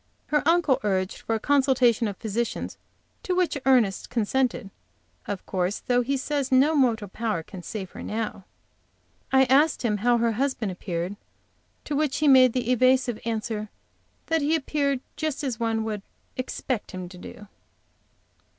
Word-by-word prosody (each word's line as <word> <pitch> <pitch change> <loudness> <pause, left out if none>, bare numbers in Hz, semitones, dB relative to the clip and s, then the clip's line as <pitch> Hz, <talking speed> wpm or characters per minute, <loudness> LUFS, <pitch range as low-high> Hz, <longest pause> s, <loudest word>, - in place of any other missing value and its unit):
Her 300 - +1
uncle 330 -5 +3
urged 190 -2 -1
for 225 - -2
a - - -1
consultation 260 -4 +3
of 200 -2 -5
physicians, 230 +2 -3 0.4
to 365 - -1
which 360 -5 +1
Ernest 235 -7 +3
consented, 235 -2 0 0.6
of 200 -2 -4
course, 185 +1 -1
though 245 0 +2
he 275 +3 -1
says 280 0 -2
no 270 +4 +5
mortal 235 -8 +2
power 210 -4 -2
can 185 +2 -10
save 190 0 -6
her - - -9
now. 215 -3 -4 0.9
I 265 0 +6
asked 280 +4 +3
him 215 -3 +1
how 240 +4 +3
her 235 0 +2
husband 235 -3 -1
appeared, 180 +1 -4 0.7
to 295 - -3
which 295 -2 0
he 305 - +2
made 255 -3 +7
the 250 -1 0
evasive 255 -1 +3
answer 220 -2 -3 0.6
that 325 -1 +1
he 300 +3 +2
appeared 280 -3 0 0.2
just 310 -2 -2
as 250 -5 -2
one 225 -1 0
would 215 -2 -3 0.3
expect 255 -2 -3
him 185 -1 -5
to 180 +1 -12
do. 210 +3 -11
240 Hz, 160 wpm, -25 LUFS, 210-270 Hz, 0.9 s, made